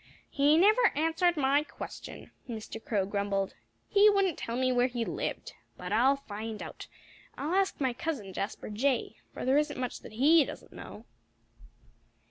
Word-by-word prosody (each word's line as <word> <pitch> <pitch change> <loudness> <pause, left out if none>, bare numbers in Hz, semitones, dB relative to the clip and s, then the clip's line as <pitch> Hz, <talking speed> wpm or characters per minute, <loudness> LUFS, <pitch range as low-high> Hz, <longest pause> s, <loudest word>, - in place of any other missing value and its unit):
"He 290 +2 +4
never 430 +7 +5
answered 325 +3 +2
my 280 0 +3
question," - - -9 0.2
Mr. 225 -1 -7
Crow 200 -4 0
grumbled. 200 -1 -1 0.3
"He 415 +1 +6
wouldn't 395 -5 +1
tell 230 - -4
me 255 0 +2
where 245 0 +3
he 240 -2 -3
lived. - - -4 0.2
But 180 +2 -5
I'll 255 +5 +4
find 220 -4 -7
out. - - -9 0.5
I'll 305 +5 -2
ask 390 0 +1
my 260 -3 +1
cousin, 240 -9 -4
Jasper 200 +2 -4
Jay; 255 +5 0
for - - -6
there 265 +3 +4
isn't 300 -3 -2
much 250 -1 -3
that - - -12
he 300 +7 +5
doesn't - - -9
know." - - -10
265 Hz, 160 wpm, -30 LUFS, 220-315 Hz, 0.5 s, He